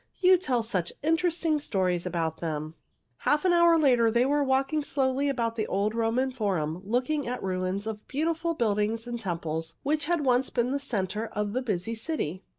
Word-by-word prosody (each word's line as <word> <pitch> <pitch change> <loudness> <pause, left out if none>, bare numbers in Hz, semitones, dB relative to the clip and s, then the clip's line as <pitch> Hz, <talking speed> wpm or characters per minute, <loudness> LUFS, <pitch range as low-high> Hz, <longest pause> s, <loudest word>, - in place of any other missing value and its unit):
You 370 0 +6
tell 265 -10 0
such 185 -6 -1
interesting 330 -1 +1
stories 185 -9 0
about 165 -2 -2
them." 155 -1 -3 0.5
Half 300 +4 +1
an 360 - +4
hour 340 -1 +6
later 250 -7 +4
they 235 +2 +3
were 290 +1 +2
walking 270 +3 +1
slowly 275 0 0
about 230 -4 -1
the 215 - -1
old 205 +2 0
Roman 230 +3 +1
Forum 185 -9 -2
looking 250 +7 -1
at 250 +1 -3
ruins 185 +1 -2
of 220 -1 -6
beautiful 330 +3 -1
buildings 220 -1 0
and 240 -1 -4
temples 165 -4 -3
which 300 +1 +1
had 340 0 +1
once 255 0 +3
been 240 +1 0
the 280 - 0
center 215 -4 -2
of 210 -1 -3
the 255 - 0
busy 215 -3 -2
city. 220 - -3
235 Hz, 180 wpm, -27 LUFS, 195-285 Hz, 0.5 s, You